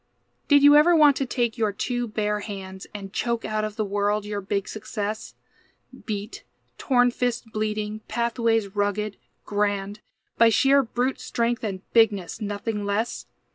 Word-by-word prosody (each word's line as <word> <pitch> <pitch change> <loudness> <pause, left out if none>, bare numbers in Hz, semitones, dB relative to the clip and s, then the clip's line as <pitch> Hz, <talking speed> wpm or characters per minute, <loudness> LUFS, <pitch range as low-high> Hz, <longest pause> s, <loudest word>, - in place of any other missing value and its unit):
Did 285 -1 +5
you 290 0 +8
ever 325 +4 +6
want 295 -3 +6
to 270 - -1
take 240 -1 -1
your 215 -2 +2
two 245 +4 -2
bare 210 -1 -1
hands, 190 -2 -7
And 195 -1 -8
choke 235 0 -1
out 215 0 -1
of 215 -1 -4
the 215 - -1
world 205 +1 0
your 205 -1 -3
big 200 0 -2
success? 215 0 -5 0.7
Beat, 205 -1 -5 0.4
torn 245 -2 +3
fists 245 0 -2
bleeding, 215 -1 -3
pathways 225 -3 0
rugged, 205 0 -1 0.3
grand, 205 0 -1 0.4
By 230 0 +7
sheer 270 +5 +4
brute 250 +1 -2
strength 235 0 -1
and 195 -4 -3
bigness, 220 -3 +2
nothing 205 +1 -3
less? 205 +4 -2
215 Hz, 150 wpm, -25 LUFS, 205-235 Hz, 0.7 s, you